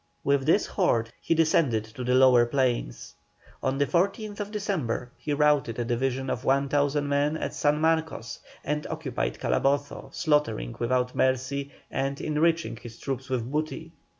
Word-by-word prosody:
With 140 Hz, 0 st, +1 dB
this 200 Hz, +6 st, +4 dB
horde 115 Hz, -, 0 dB
he 165 Hz, -, +1 dB
descended 155 Hz, -8 st, +3 dB
to 110 Hz, +3 st, -8 dB
the 125 Hz, +1 st, +2 dB
lower 130 Hz, -2 st, +6 dB
plains. 120 Hz, -, -1 dB, 0.5 s
On 130 Hz, +1 st, 0 dB
the 140 Hz, -, +3 dB
14th 205 Hz, -, -1 dB
December 180 Hz, -, -2 dB
he 150 Hz, -, -5 dB
routed 145 Hz, -5 st, +2 dB
a 120 Hz, -, -1 dB
division 130 Hz, +2 st, -1 dB
of 125 Hz, -, -3 dB
1,000 145 Hz, +1 st, +1 dB
men 145 Hz, +2 st, +1 dB
at -, -, -4 dB
San 150 Hz, +1 st, +1 dB
Marcos, 160 Hz, -7 st, 0 dB, 0.2 s
and 150 Hz, 0 st, -2 dB
occupied 155 Hz, -6 st, -3 dB
Calabozo, 140 Hz, +1 st, 0 dB
slaughtering 150 Hz, -, 0 dB
without 125 Hz, +1 st, 0 dB
mercy, 130 Hz, +2 st, 0 dB, 0.2 s
and 135 Hz, +1 st, -2 dB
enriching 165 Hz, -2 st, +1 dB
his 120 Hz, -1 st, -11 dB
troops 135 Hz, -1 st, -4 dB
with 125 Hz, -1 st, -2 dB
booty. 155 Hz, +2 st, -3 dB
140 Hz, 150 wpm, -27 LUFS, 125-155 Hz, 0.5 s, lower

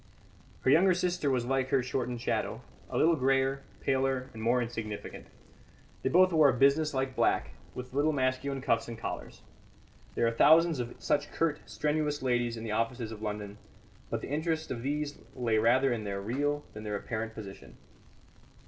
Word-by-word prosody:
Her 130 Hz, -, +3 dB
younger 180 Hz, +4 st, +5 dB
sister 180 Hz, -4 st, 0 dB
was 125 Hz, -3 st, +1 dB
like 130 Hz, 0 st, 0 dB
her 130 Hz, -1 st, +2 dB
shortened 125 Hz, -2 st, -3 dB
shadow, -, -, -1 dB, 0.3 s
a -, -, -3 dB
little 165 Hz, +1 st, +4 dB
greyer, 135 Hz, 0 st, +1 dB, 0.2 s
paler, 135 Hz, -1 st, 0 dB
and 110 Hz, -, -8 dB
more 120 Hz, +3 st, +2 dB
insignificant. 115 Hz, -3 st, -5 dB, 0.7 s
They -, -, 0 dB
both 185 Hz, +4 st, +5 dB
wore 155 Hz, -3 st, +6 dB
a -, -, +3 dB
business 140 Hz, +3 st, +3 dB
like 130 Hz, 0 st, -1 dB
black, -, -, +1 dB, 0.2 s
with 125 Hz, 0 st, -7 dB
little 145 Hz, +3 st, +2 dB
masculine 135 Hz, 0 st, -1 dB
cuffs 115 Hz, -2 st, +1 dB
and 115 Hz, -1 st, -6 dB
collars. -, -, -6 dB, 0.7 s
There -, -, +2 dB
are 115 Hz, -, +3 dB
thousands 160 Hz, +5 st, +5 dB
of 120 Hz, -1 st, -4 dB
such 145 Hz, 0 st, 0 dB
curt, 160 Hz, -2 st, 0 dB
strenuous 150 Hz, -1 st, -1 dB
ladies 120 Hz, -2 st, 0 dB
in 110 Hz, -, -6 dB
the 110 Hz, -, -4 dB
offices 115 Hz, +1 st, -1 dB
of 110 Hz, -1 st, -8 dB
London, 105 Hz, -1 st, -5 dB, 0.5 s
but -, -, -2 dB
the -, -, -7 dB
interest 160 Hz, +1 st, -1 dB
of 120 Hz, -2 st, -3 dB
these 145 Hz, +2 st, -2 dB, 0.2 s
lay 115 Hz, -3 st, +1 dB
rather 125 Hz, +4 st, +4 dB
in 110 Hz, -2 st, -3 dB
their 100 Hz, -1 st, -3 dB
real 145 Hz, +8 st, -1 dB
than 105 Hz, -, -8 dB
their 105 Hz, -1 st, -3 dB
apparent 110 Hz, +1 st, -4 dB
position. 100 Hz, -3 st, -10 dB
130 Hz, 175 wpm, -30 LUFS, 115-145 Hz, 0.7 s, wore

